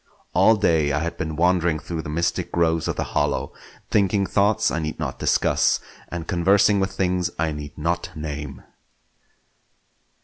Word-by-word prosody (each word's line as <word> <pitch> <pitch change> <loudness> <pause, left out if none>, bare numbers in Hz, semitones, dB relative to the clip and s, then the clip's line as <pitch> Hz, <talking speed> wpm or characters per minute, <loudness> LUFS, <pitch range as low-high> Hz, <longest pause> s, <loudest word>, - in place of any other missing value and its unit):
All 110 - +5
day 80 -7 +2
I - - +1
had 85 +1 -3
been 80 -1 -3
wandering 85 -1 +2
through 80 +1 -5
the 75 - -8
mystic 85 +3 -1
groves 80 -1 +1
of - - -1
the - - -1
hollow; - - 0 0.4
thinking 100 -1 +2
thoughts 100 +2 +2
I 85 - -1
need 75 -1 -4
not - - -4
discuss, - - +2 0.3
and 85 -2 -6
conversing 100 +3 +3
with 95 0 0
things 90 -2 0
I 80 0 0
need 75 -1 -8
not 85 +3 -1
name. 75 -3 -6
85 Hz, 160 wpm, -23 LUFS, 80-90 Hz, 0.4 s, All